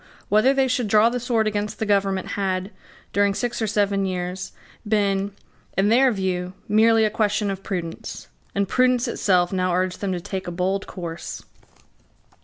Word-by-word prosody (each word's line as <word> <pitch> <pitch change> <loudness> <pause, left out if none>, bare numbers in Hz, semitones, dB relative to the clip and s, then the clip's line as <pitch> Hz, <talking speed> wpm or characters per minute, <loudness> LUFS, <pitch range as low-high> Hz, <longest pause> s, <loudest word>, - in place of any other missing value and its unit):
Whether 215 +6 +5
they 270 -1 +2
should 250 -2 0
draw 215 +2 +5
the 250 +1 -2
sword 235 -2 +1
against 210 0 -2
the 220 - -2
government 195 -2 +1
had, 190 0 -2 0.4
during 200 -1 +2
six 240 +1 -2
or 220 - +1
seven 200 -2 +1
years, 180 0 -4 0.4
been, 200 -2 +1 0.5
in 195 +2 +3
their 255 +3 +5
view, 185 -3 -2
merely 220 +1 +4
a 215 - 0
question 210 -1 +1
of 195 0 -5
prudence; 175 -5 -5 0.3
and 200 0 +1
prudence 255 +1 +2
itself 180 -2 +2
now 185 -1 +1
urged 185 0 -1
them 200 -2 -1
to 180 - -2
take 190 +1 -5
a - - -3
bold 190 +3 -1
course. 170 -3 -6
200 Hz, 170 wpm, -23 LUFS, 185-220 Hz, 0.5 s, Whether